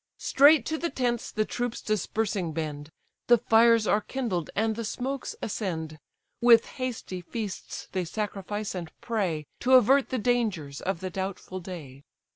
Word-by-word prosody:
Straight 285 -2 +5
to 315 0 -2
the 340 - -1
tents 240 -4 -1
the 215 - 0
troops 245 +1 -3
dispersing 210 -4 -1
bend, 150 -2 -4 0.4
The 240 - +7
fires 230 0 +5
are 210 - +3
kindled, 210 -9 -3
and 220 +1 +1
the 230 - -4
smokes 260 +4 -4
ascend; 160 -7 -3 0.4
With 235 -1 +7 0.2
hasty 225 -7 -4
feasts 205 +2 -6
they 185 -2 -1
sacrifice, 205 +2 -4
and 175 -4 -6
pray, 195 -10 -1
To 255 +2 +2
avert 260 +3 +5
the 260 - -1
dangers 210 - -1
of 185 -3 -2
the 185 0 -4
doubtful 190 0 -4
day. 160 -7 -9
215 Hz, 150 wpm, -27 LUFS, 180-240 Hz, 0.4 s, The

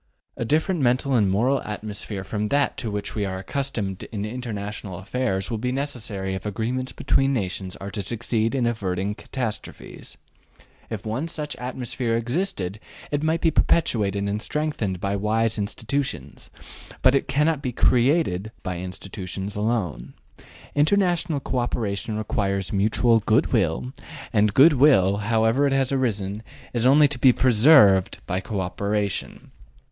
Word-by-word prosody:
A - - -3
different 160 - +1
mental 130 +2 +2
and 105 -6 +3
moral 125 +8 +2
atmosphere 105 -1 -5
from 105 +2 -2
that 140 +4 +1
to 115 - -3
which 105 -1 -4
we 105 - -1
are 95 -1 -3
accustomed 100 -3 -3
in 105 -2 -5
international 105 -5 -5
affairs 95 -1 -2
will 115 - -2
be 125 +2 -1
necessary 115 -8 -3
if 95 - -5
agreements 120 +5 -2
between 135 0 +1
nations 95 -3 -3
are 100 +1 -7
to 100 - -3
succeed 115 +3 -1
in 125 -3 +1
averting 100 -4 -1
catastrophes. 115 0 -6 0.7
If 110 -2 -6
once 130 +10 -3
such 150 -1 -4
an - - -12
atmosphere 125 -2 -2
existed 115 - -2 0.3
it 145 -1 0
might 160 +1 0
be 165 - +3
perpetuated 105 - +2
and 105 +1 -2
strengthened 135 - -2
by 100 +2 -1
wise 110 +2 0
institutions; 110 - -4 0.5
but 130 - +6
it 140 - +1
cannot 150 +2 +1
be 130 -3 -2
CREATED 120 - +2
by 90 -2 -3
institutions 95 +2 -6
alone. 105 - -2 0.6
International 175 0 +2
co 130 -1 -2
operation 110 -3 -2
requires 100 -3 -1
mutual 110 +3 +3
good - - +1
will, 65 +1 0 0.4
and 105 -1 +3
good 150 +4 +7
will, 125 -9 +5
however 115 +5 +2
it 135 - 0
has 135 -1 +1
arisen, 105 -6 -1 0.3
is 120 0 +2
only 145 +2 +6
to 140 -2 -6
be 130 +1 +7
PRESERVED 115 - +5
by 90 +1 -1
co 100 0 -3
operation. 100 +2 -3
110 Hz, 150 wpm, -24 LUFS, 100-130 Hz, 0.7 s, good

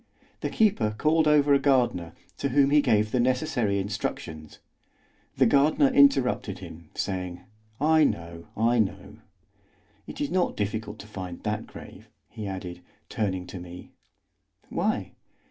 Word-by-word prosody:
The - - -2
keeper 120 - +1
called 155 +3 +3
over 145 -1 +4
a 140 - +5
gardener, 125 - +1 0.3
to 140 - -1
whom 140 +1 +3
he 150 0 +6
gave 110 -5 +2
the 125 - +1
necessary 125 -4 +1
instructions; 95 -6 -5 0.8
the - - +5
gardener 150 - +4
interrupted 270 - +3
him, 80 -1 -11
saying: 90 -2 -3 0.4
"I 155 +2 +4
know, 85 -6 -4
I 115 +2 +2
know.—It 105 -3 -8
is 145 - -2
not 180 0 0
difficult 105 +1 -3
to - - -12
find 90 -4 -7
that 105 +1 -3
grave," - - -12 0.2
he 105 -2 -6
added, 90 -2 -6 0.3
turning 95 -4 -2
to 90 - -8
me. 90 0 -11 0.8
"Why?" - - -1
110 Hz, 135 wpm, -26 LUFS, 95-140 Hz, 0.8 s, he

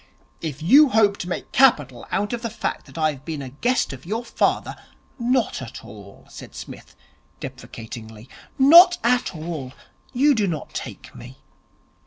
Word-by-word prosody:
'If 155 -2 -6
you 280 - +6
hope 210 -4 +3
to 175 - -5
make - - -5
capital 145 - +2
out 205 +3 -2
of 235 - -3
the 230 - -3
fact 225 - -4
that 135 - -14
I 155 -1 +2
have 135 -3 -12
been 155 -3 -5
a 130 - -7
guest 240 - -1
of 130 - -11
your 225 +7 -4
father - - -1 0.3
' - - -36
'Not 245 - 0
at 120 -3 -9
all,' 100 -1 -14
said - - -12
Psmith - - -11 0.4
deprecatingly. 110 0 -10 0.3
'Not 345 +6 +8
at 245 -4 +1
all. 155 -5 -6 0.4
You 280 +3 +3
do 215 -5 0
not 160 -4 -5
take - - -8
me. 125 +2 -12
175 Hz, 170 wpm, -22 LUFS, -, 0.4 s, Not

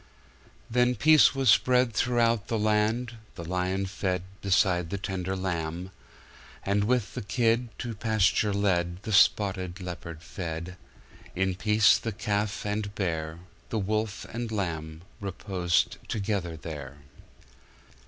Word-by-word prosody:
Then 125 +1 +2
peace 155 0 +6
was 135 -2 +4
spread 125 -2 +3
throughout 115 -2 +2
the 115 - -1
land; 110 +3 +1 0.2
The 85 - -7
lion 90 +2 -1
fed 95 -2 -2 0.2
beside 90 -3 +2
the 100 - -2
tender 95 -1 -3
lamb; 90 -1 -3 0.7
And 100 +1 +1
with 120 -2 0
the 125 - -4
kid, 115 +4 +1
To 120 -2 -4
pasture 110 -1 +2
led, 95 -2 0
The 110 - -4
spotted 95 -2 +3
leopard 85 -3 -7
fed; 85 0 -5 0.6
In 95 0 +1
peace, 105 +3 +4
the 115 - -3
calf 105 -1 -2
and 105 0 -2
bear, 80 -3 -3 0.3
The 115 - -2
wolf 105 +1 -1
and 115 0 -4
lamb 80 -5 -3 0.2
reposed 95 -3 0
together 95 -6 -2
there. 75 -3 -7
100 Hz, 125 wpm, -28 LUFS, 90-110 Hz, 0.7 s, peace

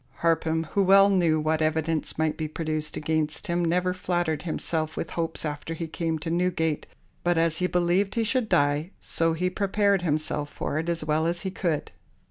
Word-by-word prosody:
Harpham, 160 -1 +2
who 200 - +2
well 195 +1 +6
knew 170 -5 +3
what 155 +1 0
evidence 160 0 0
might 160 0 +1
be 155 - -3
produced 155 -1 -3
against 155 +2 -1
him, 175 -2 0
never 180 +2 +1
flattered 175 -4 -1
himself 160 -1 -2
with 165 - -3
hopes 165 -1 -2
after 150 +2 -4
he 165 - -4
came 165 0 -2
to 165 +2 -4
Newgate, 170 -3 0 0.4
but 175 -1 +2
as 165 -1 +2
he 180 - +1
believed 180 +3 +1
he 230 - +2
should 225 0 0
die, 145 +3 +2
so 165 0 +1
he 180 +3 0
prepared 200 +1 +1
himself 155 -2 -1
for 150 - -3
it 165 +2 -3
as 165 -2 -1
well 155 +1 +1
as 175 +1 -1
he 190 - -3
could. 170 -5 -2
165 Hz, 190 wpm, -26 LUFS, 155-180 Hz, 0.4 s, well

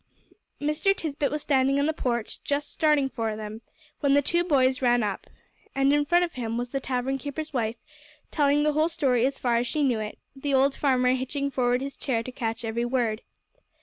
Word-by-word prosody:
Mr. 305 +7 +1
Tisbett 295 -4 -2
was 300 0 -3
standing 275 0 +2
on 285 - +2
the 315 - +1
porch, 235 -6 -3
just 285 0 -2
starting 300 -4 +3
for 225 -4 -3
them, 215 +1 -7 0.4
when 280 -2 +3
the 285 - +5
two 345 +5 +1
boys 265 -6 +2
ran 245 -2 +3
up. 205 -2 -3 0.5
And 275 +1 +3
in 290 0 +2
front 350 +3 +3
of 340 - -10
him 230 -2 -3
was 245 0 -3
the 275 - -2
tavern 265 +1 -2
keeper's 300 +3 -5
wife, 230 -3 -1 0.6
telling 290 -1 +3
the 300 0 +2
whole 310 +2 +2
story 265 -7 +2
as 270 0 -3
far 240 -2 +1
as 240 +1 0
she 300 +4 0
knew 250 -5 +2
it, 215 0 -5 0.2
the 275 0 -1
old 270 +1 +3
farmer 255 -3 +2
hitching 275 +2 -2
forward 250 -1 +1
his 275 0 -5
chair 230 -4 -1
to 255 - -7
catch 230 -2 -3
every 225 +1 -1
word. 240 -3 0
270 Hz, 210 wpm, -26 LUFS, 240-290 Hz, 0.6 s, the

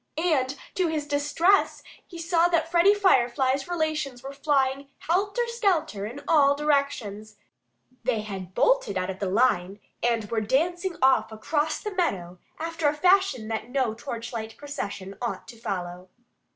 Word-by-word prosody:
And 285 -5 +1 0.2
to 370 -2 +1
his 310 -2 -2
distress 295 +7 +2 0.2
he 345 - -10
saw 335 +1 +2
that 330 -2 0
Freddie 350 +4 +5
Firefly's 265 -7 +2
relations 310 -7 -2
were 275 +1 -7
flying 275 -1 0
helter 400 +8 0
skelter 355 - 0
in 275 +6 -9
all 285 -3 +5
directions. 275 -8 -1 0.7
They 230 -3 0
had 190 -3 -7
bolted - - +2
out 185 +1 -1
of 190 - -10
the 195 - -1
line 200 -3 +1 0.2
and 230 -2 +1
were 225 -1 +1
dancing 345 - 0
off 265 -3 +4
across 295 +8 -1
the 420 - -5
meadow 185 - -2 0.2
after 330 -1 -1
a 290 - +2
fashion 360 - +3
that 225 +1 -3
no 255 -4 0
torchlight 230 -1 -6
procession 200 -9 -6
ought 240 - -4
to 240 - -10
follow. 180 -4 -5
275 Hz, 150 wpm, -26 LUFS, 220-330 Hz, 0.7 s, Freddie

